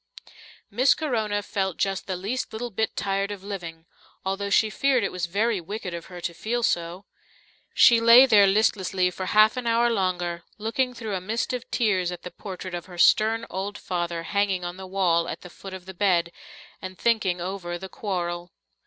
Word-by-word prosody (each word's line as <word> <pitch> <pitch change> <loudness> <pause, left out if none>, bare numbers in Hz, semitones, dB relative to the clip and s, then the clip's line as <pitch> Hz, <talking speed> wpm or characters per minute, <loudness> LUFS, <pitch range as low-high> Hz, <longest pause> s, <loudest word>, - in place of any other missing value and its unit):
Miss 255 +6 +4
Corona 220 -8 -1
felt 190 -4 -2
just 195 -1 -1
the 190 - -2
least 205 +8 -3
little 240 +2 -4
bit 220 +2 -1
tired 195 0 -1
of 200 -2 -7
living, 170 -5 -7 0.4
although 195 +1 -2
she 215 +1 +3
feared 260 +2 +2
it 200 - -1
was 180 -1 -3
very 205 +2 0
wicked 195 +1 -6
of 170 -1 -7
her 180 -1 -9
to 170 - -3
feel 235 +7 -2
so. 175 0 -1 0.7
She 235 -1 +7
lay 230 +3 +9
there 210 -6 +6
listlessly 190 -3 +2
for 185 0 -5
half 215 +3 +5
an 250 -2 -3
hour 235 +1 +3
longer, 180 -4 -1 0.2
looking 250 +4 -1
through 225 -3 -5
a 185 - -2
mist 220 +6 -2
of 250 -1 -5
tears 190 -7 +1
at 175 - -8
the 180 - -7
portrait 185 -2 -8
of 175 0 -5
her 180 -1 -11
stern 220 +5 +4
old 200 +2 -4
father 175 -2 -3
hanging 195 -1 0
on 175 0 -5
the 190 0 -8
wall 175 -3 +1
at - - -6
the 180 - -11
foot 195 - -10
of 185 -1 -11
the 190 - -9
bed, 175 -3 +1 0.5
and 185 0 -7
thinking 210 -6 +1
over 175 -1 -4
the 190 +2 -8
Quarrel. 175 -3 -4
195 Hz, 195 wpm, -25 LUFS, 180-220 Hz, 0.7 s, lay